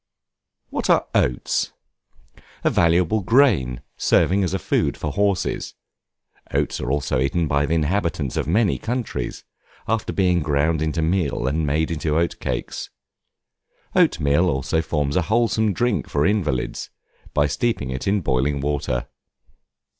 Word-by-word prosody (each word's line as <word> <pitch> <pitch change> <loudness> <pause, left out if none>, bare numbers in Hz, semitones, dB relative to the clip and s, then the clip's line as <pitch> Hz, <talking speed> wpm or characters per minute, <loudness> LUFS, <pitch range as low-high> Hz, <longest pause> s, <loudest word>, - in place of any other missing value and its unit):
What - - -2
are - - +4
Oats? - - 0 0.9
A - - +3
valuable 85 +5 +3
grain, 90 - +3 0.2
serving 100 +2 +3
as 90 - -1
food 95 - 0
for 75 - -3
horses. 100 +2 -1 0.8
Oats - - -1
are 65 - -2
also 70 -3 0
eaten 75 +5 +1
by 70 0 +1
the 80 - +1
inhabitants 80 -4 -1
of - - -1
many 105 +6 +2
countries, 120 0 -3 0.4
after 110 0 -1
being 90 -2 +2
ground 75 +2 +1
into 80 +1 0
meal 80 -6 0
and 75 +3 0
made 80 +3 0
into 75 -1 -1
oat 85 +1 0
cakes. - - -4 1.1
Oatmeal 75 +6 +3
also 70 +3 0
forms 75 -3 -1
a 90 - +3
wholesome 110 +2 +1
drink 120 +3 0
for 70 0 +1
invalids, 90 -11 -1 0.5
by 75 - +4
steeping 75 - -1
it 65 +5 -4
in 100 0 +2
boiling 70 0 0
water. 70 -4 -2
80 Hz, 135 wpm, -22 LUFS, 70-95 Hz, 1.1 s, are